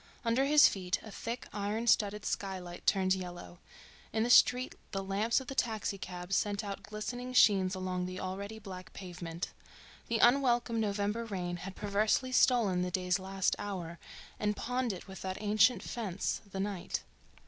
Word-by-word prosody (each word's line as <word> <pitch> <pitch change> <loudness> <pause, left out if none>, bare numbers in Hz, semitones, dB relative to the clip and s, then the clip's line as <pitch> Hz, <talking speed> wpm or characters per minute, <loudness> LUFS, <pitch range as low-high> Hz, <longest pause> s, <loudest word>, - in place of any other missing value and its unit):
Under 235 +4 +3
his 295 +1 +8
feet 185 -2 -1
a 215 - -9
thick, 235 +4 -5
iron 210 +3 -2
studded 210 -1 +2
skylight 185 -3 -4
turned 185 -1 +4
yellow; 175 -2 -6 0.5
in 220 0 +1
the 240 - +1
street 250 +1 +6 0.2
the 195 0 -1
lamps 205 +5 +1
of 265 - -8
the 270 - -5
taxi 220 -5 -1
cabs 180 +1 -4
sent 205 0 0
out 200 -1 -5
glistening 245 +5 -5
sheens 190 -6 +5
along 185 -1 -2
the 185 0 -6
already 200 +3 -5
black 190 -4 -9
pavement. 175 -2 -6 0.6
The 230 - +1
unwelcome 240 -1 +4
November 205 +1 0
rain 180 -5 -3
had 190 +2 -7
perversely 215 +5 +1
stolen 230 -8 +4
the 180 - 0
day's 180 +1 0
last 190 0 0
hour 175 -5 -5 0.4
and 210 -1 0
pawned 250 -1 -1
it 185 0 -8
with 190 0 -9
that 190 0 -3
ancient 210 +1 +3
fence, 200 -6 -3
the 190 - -4
night. 195 -2 -3
200 Hz, 165 wpm, -32 LUFS, 185-225 Hz, 0.6 s, his